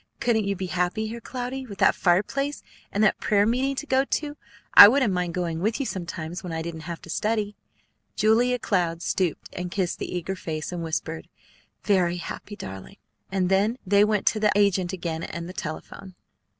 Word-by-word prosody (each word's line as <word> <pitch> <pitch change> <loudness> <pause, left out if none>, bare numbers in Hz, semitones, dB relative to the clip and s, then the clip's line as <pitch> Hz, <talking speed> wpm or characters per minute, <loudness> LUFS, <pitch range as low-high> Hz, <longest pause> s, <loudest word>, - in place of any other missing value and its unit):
Couldn't 225 -3 +1
you 200 0 0
be 190 - -4
happy 180 +4 -1
here, 235 +1 -7
Cloudy, 255 +2 -5
with 200 -3 -9
that - - +5
fireplace, 240 +11 0 0.3
and 205 - +1
that 215 - +3
prayer 205 -1 +3
meeting 260 +5 +1
to 300 - -4
go 265 -2 +3
to? 290 +1 -2 0.4
I - - +13
wouldn't 245 -3 +3
mind 180 -2 -2
going 170 -3 -2
with 215 - 0
you 275 - -1
sometimes 175 -3 -5
when 180 - -5
I 160 0 -3
didn't 160 -1 -7
have 170 - -6
to - - -12
study." 210 0 -1 0.6
Julia 240 +4 +3
Cloud 175 -7 -1
stooped, 180 -5 -1
and 180 0 -4
kissed 185 -1 -2
the - - -4
eager 180 +2 -3
face, 155 -3 -5
and 175 -1 -4
whispered, 160 0 -4 0.5
"Very 180 -4 +2
happy, 190 +4 -7
darling!" 95 - -9 0.3
And 190 -2 +1
then 200 +6 +2
they 200 +2 +5
went 210 -1 +1
to 215 - +2
the 210 -1 +3
agent 195 -3 +2
again 170 -3 -4
and 170 0 -5
the 180 - -8
telephone. 185 +4 -7
190 Hz, 190 wpm, -25 LUFS, 175-220 Hz, 0.6 s, I